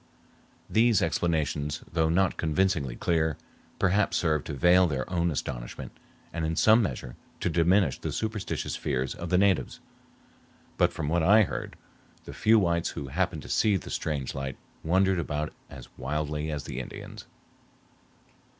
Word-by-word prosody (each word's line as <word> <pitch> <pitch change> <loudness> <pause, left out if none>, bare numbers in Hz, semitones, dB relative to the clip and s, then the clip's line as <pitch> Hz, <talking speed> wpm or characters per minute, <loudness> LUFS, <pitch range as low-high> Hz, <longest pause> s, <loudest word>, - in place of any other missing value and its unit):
These 110 -3 +3
explanations, 75 -5 -1
though 80 -1 +2
not 95 +3 +2
convincingly 80 -5 0
clear, 80 -2 0 0.4
perhaps 95 -1 +2
served 80 -5 0
to - - -4
veil 90 +4 +5
their 65 -4 -2
own 85 -1 +1
astonishment - - -5 0.4
and 85 0 -3
in 80 +1 -1
some 110 +7 +5
measure 60 - -4 0.2
to 85 - -1
diminish 85 -1 +3
the - - -4
superstitious 110 -2 -3
fears 65 -1 -2
of 85 - -6
the 90 - +3
natives; 100 0 +2 1.0
but - - +4
from 80 - -4
what 85 +3 +1
I 105 +6 +6
heard, - - -5 0.5
the - - -8
few 110 +1 +4
whites 85 -4 +1
who 70 - -6
happened 85 0 -1
to - - -10
see 105 -3 +3
the - - -8
strange 70 -4 -2
light 70 -1 -5 0.3
wondered 95 +2 +2
about 75 -1 -3 0.2
as - - -10
wildly 75 +2 -2
as 75 -2 -3
the - - -5
Indians. 65 - -9
80 Hz, 150 wpm, -28 LUFS, 75-95 Hz, 1.0 s, I